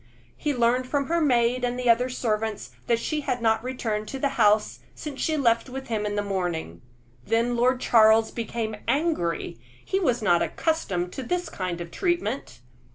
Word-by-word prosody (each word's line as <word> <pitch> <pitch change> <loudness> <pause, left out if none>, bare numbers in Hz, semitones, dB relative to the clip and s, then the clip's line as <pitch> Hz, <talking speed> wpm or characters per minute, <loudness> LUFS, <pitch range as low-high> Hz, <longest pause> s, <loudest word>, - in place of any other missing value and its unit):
He 300 - -1
learned 250 0 +1
from 280 +1 0
her 335 0 +2
maid 250 -3 +2
and 245 0 -1
other 245 0 +3
servants 220 -3 -2 0.2
that 235 - +3
she 300 +6 -2
had 250 -3 -2
not 220 -1 +2
returned 225 -4 -3
to 270 - -5
the 280 +1 0
house 210 -3 +2 0.2
since 290 -3 -7
she 315 -1 +1
left 235 -2 +2
with 265 0 -7
him 210 -2 -1
in 205 - -3
the 205 - 0
morning. 175 - -3 0.4
Then 230 - +1
Lord 250 +2 +2
Charles 220 -2 +5
became 225 -2 -4
angry; 235 - -1 0.3
he 385 - 0
was 245 - 0
not 175 -4 +4
accustomed 185 - -1
to - - -5
this 355 +8 -2
kind 180 -2 -4
of 170 0 -7
treatment. 345 - -2
235 Hz, 175 wpm, -25 LUFS, 215-265 Hz, 0.4 s, Charles